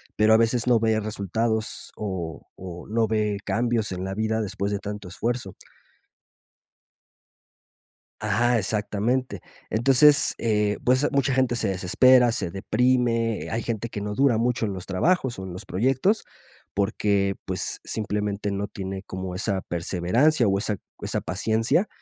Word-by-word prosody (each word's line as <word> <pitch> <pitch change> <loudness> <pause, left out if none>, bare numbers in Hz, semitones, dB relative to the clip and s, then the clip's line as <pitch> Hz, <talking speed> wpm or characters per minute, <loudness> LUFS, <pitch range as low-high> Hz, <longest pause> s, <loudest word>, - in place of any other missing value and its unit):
pero 110 +1 +4
a 110 - +7
veces 115 +1 +2
no 120 -2 +5
ve 110 -1 +2
resultados 110 +2 -2
o 90 -7 -5
o 90 -2 -8
no 110 +1 +1
ve 105 -2 0
cambios 115 -2 0
en 90 - -4
la 95 - -3
vida 110 +1 0
después 100 -1 -2
de 100 - -1
tanto 105 -1 -6
esfuerzo. 115 +1 -3 2.7
Ajá, 115 +3 +2
exactamente. 110 +5 -1 0.3
Entonces, 135 +6 +5
eh, 105 -2 +1
pues, 130 +3 +3
mucha 140 -2 +2
gente 130 -2 +2
se 110 -3 0
desespera, 120 +7 +4
se 95 -6 -2
deprime, 115 +3 +1
hay 115 +1 -1
gente 115 0 -3
que 105 - -5
no 105 0 -3
dura 130 -3 +3
mucho 120 0 0
en 100 - -1
los 95 -1 -7
trabajos 130 - +1
o 95 - -5
en 95 - -7
los 90 - -8
proyectos, 130 - +1 0.5
porque, 100 -1 +1
pues, - - -3
simplemente 105 -1 -2
no 100 +1 -3
tiene 95 0 -6
como 95 -1 -6
esa 100 0 -1
perseverancia 95 - +2
o 95 - +2
esa 105 0 -2 0.3
esa - - -2
paciencia. 110 - 0
110 Hz, 145 wpm, -25 LUFS, 100-120 Hz, 2.7 s, a